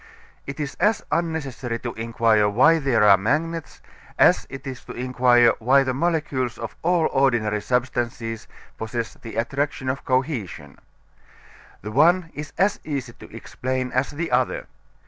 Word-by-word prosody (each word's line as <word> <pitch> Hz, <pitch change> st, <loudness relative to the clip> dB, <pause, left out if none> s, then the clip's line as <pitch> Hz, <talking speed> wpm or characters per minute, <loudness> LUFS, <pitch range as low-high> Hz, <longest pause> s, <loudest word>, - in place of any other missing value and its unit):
It 135 Hz, +2 st, -6 dB
is 145 Hz, -2 st, -3 dB
as 215 Hz, 0 st, +2 dB
unnecessary 135 Hz, -8 st, -2 dB
to 120 Hz, -2 st, -4 dB
inquire 115 Hz, -2 st, +2 dB
why 150 Hz, +10 st, +4 dB
they 135 Hz, -4 st, 0 dB
are 105 Hz, -3 st, +7 dB
magnets 160 Hz, +9 st, -2 dB, 0.4 s
as -, -, +4 dB
it 135 Hz, +1 st, -9 dB
is 130 Hz, -2 st, -7 dB
to -, -, -8 dB
inquire 125 Hz, -1 st, +3 dB
why 135 Hz, +4 st, +4 dB
the 130 Hz, -1 st, -1 dB
molecules 140 Hz, -5 st, -1 dB
of -, -, -7 dB
all 170 Hz, -1 st, +2 dB
ordinary 120 Hz, -6 st, +1 dB
substances 120 Hz, -2 st, -2 dB, 0.3 s
possess 115 Hz, 0 st, -4 dB
the 115 Hz, -, -10 dB
attraction 135 Hz, +3 st, -2 dB
of 130 Hz, +1 st, -3 dB
cohesion. 130 Hz, -, -2 dB, 1.0 s
The 105 Hz, -, -5 dB
one 165 Hz, +6 st, +3 dB
is 150 Hz, +1 st, -7 dB
as 195 Hz, +3 st, +2 dB
easy 140 Hz, -5 st, -4 dB
to -, -, -14 dB
explain 130 Hz, 0 st, -4 dB
as 130 Hz, +2 st, 0 dB
the 165 Hz, +1 st, -4 dB
other. 125 Hz, 0 st, 0 dB
130 Hz, 145 wpm, -23 LUFS, 120-150 Hz, 1.0 s, are